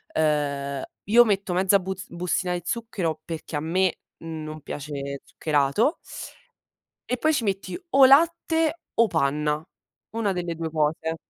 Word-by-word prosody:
uhm, 140 -3 0 0.2
io 235 +3 +6
metto 200 -3 0
mezza 190 +2 +4
buz 190 0 -5
bustina 180 +1 -1
di 175 - -2
zucchero 185 -9 -2
perché 165 -1 -6
a 145 - +1
me 180 +3 +1 0.2
non 155 -2 -6
piace 140 -1 -5
zuccherato 150 - +1 1.1
e 250 - -1
poi 315 +3 +2
ci 245 - 0
metti 195 - -2
o 270 -2 +8
latte 325 +3 +3
o 230 - +5
panna, 150 0 0 0.5
una 220 -3 0
delle 175 -2 -3
due 160 -1 -4
cose. 160 +1 0
170 Hz, 140 wpm, -25 LUFS, 150-210 Hz, 1.1 s, o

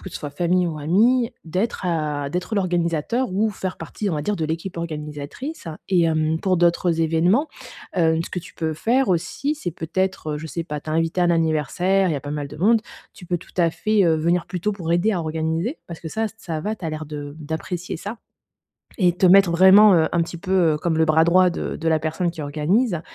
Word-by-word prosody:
que - - -8
ce - - -6
soit 145 - -6
famille 175 +4 +1
ou 155 -2 -5
amis, 230 - +2
d'être 185 +7 -2
à 150 -4 -1
d'être 180 +7 -3
l'organisateur 180 - 0
ou 215 +3 +1
faire 190 -2 -5
partie, 165 +6 -4
on 175 - -1
va 150 - -2
dire, 210 +6 -1
de 160 - -2
l'équipe 165 +4 -4
organisatrice 155 - -6 0.2
et 180 -3 +3
hem, 160 -1 +1
pour 185 +1 +1
d'autres 170 -1 +2
événements, 170 - +2 0.5
hem, 165 -2 +2
ce - - -9
que - - -3
tu 175 - -11
peux 160 -1 -2
faire 240 - +1
aussi, 270 - -1
c'est 175 - -4
peut-être, 165 -1 -2
heu, - - -4
je 160 - -7
sais 170 +2 -4
pas, 150 -2 -5
tu 155 - -12
es - - -1
invité 165 +2 0
à - - +4
un 175 - +3
anniversaire, 170 +4 +1
il - - 0
y - - -1
a - - -4
pas 145 - -7
mal 145 -1 -3
de 150 +2 -11
monde. 220 +7 +3 0.3
Tu 180 - -13
peux 175 0 -1
tout 165 - -16
à 170 -2 +3
fait, 215 +3 +1
heu, 165 -2 +4
venir 170 +2 0
plus 180 -1 -5
tôt 210 - 0
pour 175 -5 -3
aider 175 +6 +2
à 195 - 0
organiser 160 - -2
parce 170 -1 -7
que 165 - -7
ça, 220 +7 -1
ça 165 -7 -4
va, 215 +6 -3
tu 190 - -10
as 160 - -2
l'air 155 0 -5
de 145 -1 -7
d'apprécier 160 +3 -4
ça 205 +7 -7 0.8
et 180 -4 +3
te 180 +2 +2
mettre 190 0 +6
vraiment, 190 +4 +7
heu, 160 -2 +3
un 170 - +2
petit 170 +1 -6
peu 180 -4 +2
comme 170 -2 0
le 160 - +4
bras 160 0 +4
droit 180 +2 +4
de - - -4
de 165 - -2
la 160 -1 +3
personne 165 +3 -1
qui 165 - -9
organise 160 - 0
170 Hz, 240 wpm, -22 LUFS, 160-190 Hz, 0.8 s, vraiment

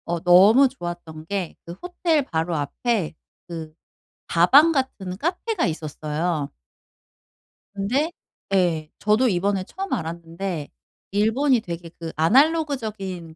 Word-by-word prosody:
어 170 0 -2
너무 195 +10 +7
좋았던 175 -9 -7
게 195 -3 -3
그 170 - -7
호텔 345 -4 0
바로 165 -2 -1
앞에 165 - -1 0.3
그 160 -2 -7 0.5
다방 275 - +6
같은 215 - -2
카페가 355 - -1
있었어요. 155 -1 -3 1.2
근데 250 +11 0 0.4
예 165 -5 +1
저도 215 +5 +3
이번에 195 0 0
처음 390 - -5
알았는데 165 0 -4 0.4
일본이 225 +5 +2
되게 170 -4 -7
그 165 -1 -5
아날로그적인 215 - +1
185 Hz, 235 characters per minute, -23 LUFS, 165-255 Hz, 1.2 s, 너무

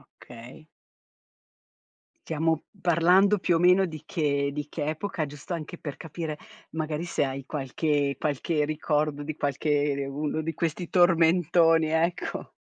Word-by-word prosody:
Okay. 120 +6 -14 1.6
Stiamo 160 0 0 0.2
parlando 180 +4 +4
più 175 -2 +2
o - - +2
meno 180 +3 +5
di 155 -4 -6
che 140 -3 0
di 145 +1 -4
che 150 -3 -3
epoca, 155 +1 -2
giusto 145 +4 -9
anche 170 +1 -5
per 145 -4 -7
capire 160 -1 -5 0.3
magari 155 0 -3
se 175 - -1
hai 135 0 -5
qualche 145 0 -1
qualche 150 +1 0
ricordo 150 -1 -1
di 150 +1 -5
qualche 145 0 0
de 140 0 -3
uno 150 +3 -2
di 160 +1 -3
questi 170 +1 -2
tormentoni, 170 -2 +4
ecco. 165 +2 -1
155 Hz, 140 wpm, -27 LUFS, 145-170 Hz, 1.6 s, meno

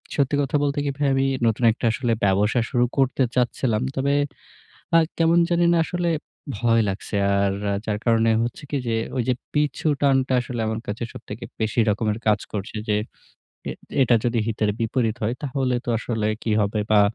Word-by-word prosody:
সত্যি 140 -1 +1
কথা 140 +1 -1
বলতে 145 0 0
কি - - 0
ভাই, 145 -1 +1
আমি 135 - +2 0.2
নতুন 115 +2 0
একটা 115 - -4
আসলে 120 0 -1
ব্যবসা 105 +5 +3
শুরু 120 -2 +3
করতে 135 -1 +2
চাচ্ছিলাম। 120 -2 +1
তবে 140 +1 +1 0.8
আ - - +9 0.2
কেমন 165 +1 +4
জানি 175 0 +3
না - - +3
আসলে 175 -1 -1 0.5
ভয় 115 0 +3
লাগছে। 100 +2 -5 0.3
আর 100 -1 +2 0.3
যার 105 -1 -1
কারণে 115 -1 +3
হচ্ছে 120 +6 -5
কি 145 - -1
যে 115 - +1 0.2
ওই 120 - +1
যে 130 - +3 0.2
পিছু 150 0 0
টানটা 135 -2 +3
আসলে 120 -1 -4
আমার 110 0 -2
কাছে 105 +3 -3
সবথেকে - - -8 0.2
বেশি 110 +2 0
রকমের 105 +1 0
কাজ 105 0 +4
করছে, 100 +1 -5
যে 105 - +3 0.7
এ - - -2 0.3
এটা 120 -2 +5
যদি 120 -1 +1
হিতের 105 -1 0
বিপরীত 115 -1 0
হয়, 115 - 0
তাহলে 130 -2 0
তো - - -3
আসলে 110 -2 -2 0.2
কি 110 - 0
হবে? 105 +1 0
বা 105 - +6
120 Hz, 180 wpm, -23 LUFS, 110-135 Hz, 0.8 s, আ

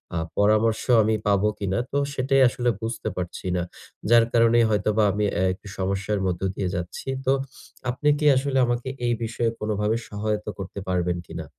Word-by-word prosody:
আ - - 0 0.2
পরামর্শ 110 +2 +3 0.2
আমি 110 +1 +2
পাবো 100 0 +3
কিনা। 95 -1 -1
তো 140 - 0 0.2
সেটাই 135 0 +2
আসলে 120 0 0
বুঝতে 115 0 -4
পারছি 90 0 -5
না। 90 - 0 0.5
যার 120 -1 +7
কারণেই 115 0 +5
হয়তোবা 105 +1 +2
আমি 105 +2 0
অ্যা 95 +1 -1
সমস্যার 100 +2 -1
মধ্য 90 -2 -1
দিয়ে 95 -2 -2
যাচ্ছি। 90 +7 -5 0.2
তো 135 - +4 0.6
আপনি 140 +4 +1
কি 150 - -1
আসলে 135 +1 0
আমাকে 120 +1 -2 0.2
এই 120 - +2
বিষয়ে 115 +1 -1
কোনভাবে 105 0 0
সহায়তা 105 +1 -2
করতে 100 +1 -6
পারবেন 90 -1 0
কিনা? 80 -1 -6
105 Hz, 165 wpm, -24 LUFS, 95-120 Hz, 0.6 s, যার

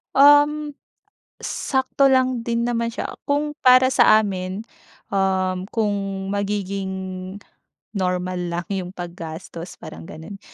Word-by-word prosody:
Um. 290 +1 +5 0.6
Sakto 270 0 +1
lang 255 -2 +2
din 235 0 -1
naman 235 -1 0
siya. 230 - -5
Kung 295 +1 -1
para 255 0 +6
sa 215 - +7
amin, 195 0 -2 0.5
um, 190 -1 0
kung 215 -3 0 0.4
magiging, 190 -2 -3 0.5
normal 180 -2 -1
lang 170 0 -2
'yong 185 -1 -3
paggastos 170 0 -7
parang 80 +1 -10
ganun, 180 +6 -9
200 Hz, 110 wpm, -22 LUFS, 185-255 Hz, 0.6 s, sa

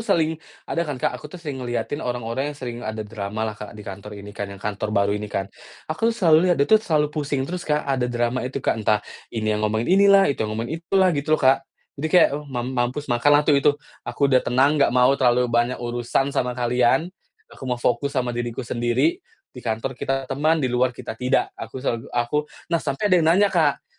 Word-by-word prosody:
sering 165 -7 +1 0.3
ada 170 - -2
kan, 150 -5 -2
Kak? - - 0
Aku 150 - -9
sering 145 -6 -6
ngelihatin 120 +4 -3
orang-orang 125 +2 -3
yang 150 - -7
sering 120 -3 -6
ada 110 -2 -4
dramalah, 105 +1 -4
Kak, 105 0 -10
di 105 - -10
kantor 100 +1 -8
ini 100 0 -10
kan, 100 -1 -5
yang 100 - -9
kantor 105 +1 -4
baru 100 0 +3
ini 105 0 -3
kan. 100 - -2 0.4
Aku 160 +9 0
selalu 180 -7 +4
lihat 175 - +3
dia 140 - +3
tuh 215 +7 +5
selalu 150 -7 0
pusing 145 -3 -1
terus, 180 +5 -4
Kak, 150 0 +1
ada 130 -3 0
drama 120 +1 -1
itu, 135 0 -6
Kak, 110 - +1
entah 105 -1 +1 0.2
ini 110 -2 -1
yang 105 - -1
ngomong 110 +2 0
inilah, 195 +1 +6
itu - - -11
yang 110 -1 -2
ngomong 115 +4 -3
itulah, 180 +3 +2
gitu 155 +1 +1
loh, - - -9
Kak. 135 +1 +3 0.3
Jadi 155 - -1
kayak, - - +7
eee, 150 +1 -4
"Mam 125 -2 -3
mampus 125 +3 -1
makanlah 145 +5 +4
tuh 150 - +4
itu. 145 - +5 0.4
Aku 140 - 0
udah 130 -2 +4
tenang, 140 +4 +2
nggak 140 - +5
mau 125 +2 +4
terlalu 125 -2 +3
banyak 120 +1 +1
urusan 120 +3 -1
sama 125 -1 -1
kalian. 125 +7 +2 0.4
Aku 130 - -8
mau 125 - 0
fokus 120 +3 -1
sama 125 -1 0
diriku 120 +1 -4
sendiri. 120 +6 0 0.3
Di 125 - -10
kantor 115 +3 -2
kita 135 +1 -2
teman, 155 +3 +1
di - - +3
luar 125 0 +1
kita - - -6
tidak. 125 +4 0
Aku - - -7
selalu 125 -1 -3
aku" 125 +5 -1 0.2
Nah, 165 - +2
sampai 135 - -3
ada 180 - +6
yang 160 - +2
nanya, 195 +4 +4
Kak. 155 -6 +2
130 Hz, 220 wpm, -23 LUFS, 120-150 Hz, 0.4 s, kayak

